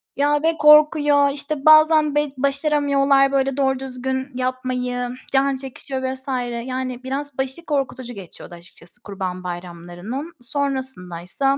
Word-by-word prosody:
Ya, 290 +1 +1
ve 325 0 +2
korkuyor. 300 -1 +6
İşte, 285 0 -4
bazen 310 -1 +6
be 295 0 +2
başaramıyorlar, 280 0 +2
böyle, 270 -1 0
doğru 265 -1 +1
düzgün 260 +1 -4
yapmayı, 255 -1 -2 0.2
can 275 0 +3
çekişiyor 265 0 -5
vs. 260 0 -10 0.4
Yani, 255 -1 -4
biraz 275 +1 -4
başı 265 +5 -3
korkutucu 265 -4 -2
geçiyordu, 185 -3 -8
açıkçası 175 +5 -15
Kurban 185 -3 -5
Bayramlarının. 175 - -7
Sonrasındaysa, 265 - -2
265 Hz, 120 wpm, -21 LUFS, 250-285 Hz, 0.4 s, korkuyor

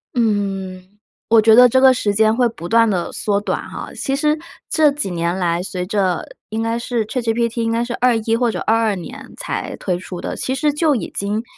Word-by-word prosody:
嗯， 195 -4 -2 0.3
我 225 -1 +6
觉 220 +1 +5
得 250 +2 +8
这 260 - +3
个 260 -1 +7
时 210 -4 -1
间 220 +1 +3
会 245 0 +3
不 175 -6 -8
断 230 +1 +4
地 180 -4 -2
缩 205 -2 -1
短 - - -2
哈。 - - -7
其 270 - -2
实 300 +2 +1 0.3
这 310 -2 +4
几 280 -10 -4
年 170 +1 -1
来， 175 -1 0
随 180 -1 -4
着 190 -2 0 0.2
应 220 +1 -3
该 230 +1 -1
是 235 -2 -2
ChatGPT 235 -1 -1
应 225 - 0
该 230 +1 0
是 240 0 -4
21 225 -2 +1
或 240 0 +1
者 180 - -3
22 225 -2 +1
年 250 +8 -9
才 - - -4
推 180 -3 -2
出 180 -1 -8
的， - - -4
其 260 - -2
实 295 0 +1
就 300 -1 +2
已 235 - -4
经 205 +3 -2
225 Hz, 250 characters per minute, -19 LUFS, 195-245 Hz, 0.3 s, 得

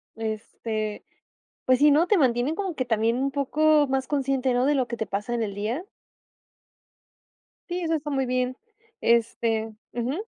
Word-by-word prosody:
este, 220 -1 -4 0.6
pues 255 -1 +4
sí, 295 0 +6
¿no?, 315 +5 +4
te 415 - +4
mantienen 255 +2 +2
como 385 -4 -2
que 255 - -1
también 225 0 +1
un 275 +1 0
poco 295 +2 +3
más 265 -1 0
consciente, 270 -2 +1
¿no?, 250 +2 +2
de 295 - +3
lo 260 -3 +1
que 235 - -4
te 220 - -2
pasa 205 +4 -3
en 230 - 0
el 200 -2 -3
día. 220 - -2 1.9
Sí, 355 +1 -2
eso 325 -1 0
está 295 -1 -4
muy 270 -2 0
bien, 255 0 0 0.5
este, 225 -1 +1 0.2
ujú. 255 - -2
255 Hz, 170 wpm, -25 LUFS, 230-290 Hz, 1.9 s, sí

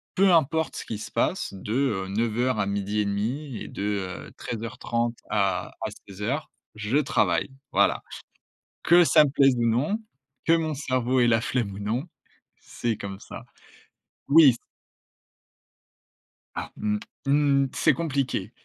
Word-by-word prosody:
«Peu 195 0 +5
importe 160 -1 +2
ce - - -6
qui 110 - -4
se 110 0 -8
passe 115 - 0
de, 100 +3 -5
heu, 115 -8 0
9:00 115 +3 0
à 100 - +2
12:30 105 +6 -2
et - - -7
de, 100 - -6 0.4
heu, - - -14
13:30 115 0 -3
à 100 -3 +1
à - - -2 0.2
16:00 110 +11 -3 0.3
je 110 +6 0
travaille». 145 -1 +1 0.2
Voilà, - - +2 0.8
que 175 +1 +7
ça 150 0 +6
me - - -1
plaise 135 -2 +4
ou 120 - +1
non, 140 - +1 0.5
que 165 - +5
mon 160 -2 -1
cerveau 130 -2 0
ait 120 - +5
la 115 -1 +3
flemme 120 -5 -1
ou 100 - -8
non, 110 +7 -1 0.6
c'est 115 -2 -3
comme 100 -2 -6
ça. - - -10 0.9
Oui 145 -4 +8
c - - -9 2.0
Ah, - - -5
mmh 105 0 0 0.3
mh. 140 -1 +3
C'est - - +3
compliqué. 140 -5 -2
120 Hz, 145 wpm, -26 LUFS, 105-140 Hz, 2.0 s, Oui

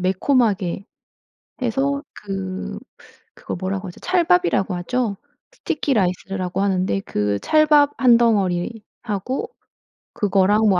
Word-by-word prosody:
매콤하게 195 -1 +1 0.8
해서 275 +4 0
그 195 -2 -5 0.6
그거 - - -6
뭐라고 190 +1 -3
하죠? 175 - -11
찰밥이라고 355 - +2
하죠? 220 +3 -1 0.4
스티키 290 -3 -2
라이스라고 185 -1 -1
하는데 190 0 +1
그 105 - -1
찰밥 300 -2 +4
1 245 -3 +6
덩어리하고 215 +2 -1 0.6
그거랑 205 +2 +3
뭐 185 -2 +3
200 Hz, 245 characters per minute, -21 LUFS, 185-250 Hz, 0.8 s, 1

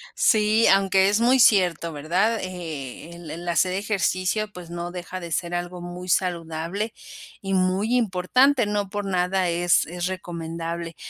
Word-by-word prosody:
Sí, 215 +1 +3
aunque 195 0 +4
es 210 - +2
muy 250 +3 +4
cierto, 180 -7 +4
¿verdad? 185 +10 0
Eh, 165 -5 -7
el 170 -3 -9
el 170 +2 -7
hacer 180 +2 +2
ejercicio, 200 +1 -1
pues 180 -4 -11
no 175 0 -5
deja 180 +1 -6
de 170 -2 -8
ser 170 +2 -2
algo 175 0 -4
muy 180 +1 -8
saludable 175 +4 -1 0.5
y 195 0 -3
muy 190 +5 +1
importante. 240 +4 +3
No 205 -1 -2
por 205 0 -4
nada 185 -1 0
es 175 0 +2
es 175 +1 -4
recomendable. 170 -2 -5
180 Hz, 150 wpm, -24 LUFS, 170-200 Hz, 0.5 s, aunque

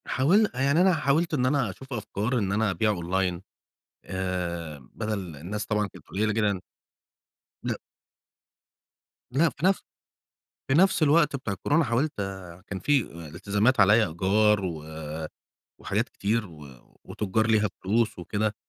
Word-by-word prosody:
حاول 195 +11 +3
يعني 140 +6 +2
أنا 185 0 +5
حاولت 155 +2 +1
إن 125 -4 +2
أنا 135 -4 +2
أشوف 130 +8 -9
أفكار 110 +2 -2
إن 100 -2 -1
أنا 105 0 +1
أبيع 100 +4 +1
أونلاين 90 -1 -1 0.6
آآ 85 -4 -3
بدَل 100 -7 -4
الناس 100 +9 -5
طبعًا 105 -1 0
كانت - - -16
قليّلة 105 +2 0
جدًا. 105 -3 +1 1.0
لأ. - - -1 1.6
لأ 155 +6 +3
في 150 +3 -4
نفْ 195 0 +3 0.9
في 135 - +2
نفْس 190 -2 +4
الوقت 150 -1 +4
بتاع 120 -7 -3
الكورونا 145 - +1
حاولت 130 +4 +1
آآ، 95 -3 -6
كان 95 - -4
في 145 +3 +3
آآ 85 -1 -9
إلتزامات، 100 - +1
عليَّ 105 +3 +6
إيجار 100 +4 +2
و 80 -4 -4 1.0
وحاجات - - -1
كتير 110 +2 -1
و 75 -5 -12 0.4
وتُجّار 110 +2 -1
ليها 110 -2 +3
فلوس 110 +3 +1
وكده، 105 +4 -1
105 Hz, 140 wpm, -27 LUFS, 95-130 Hz, 1.6 s, عليَّ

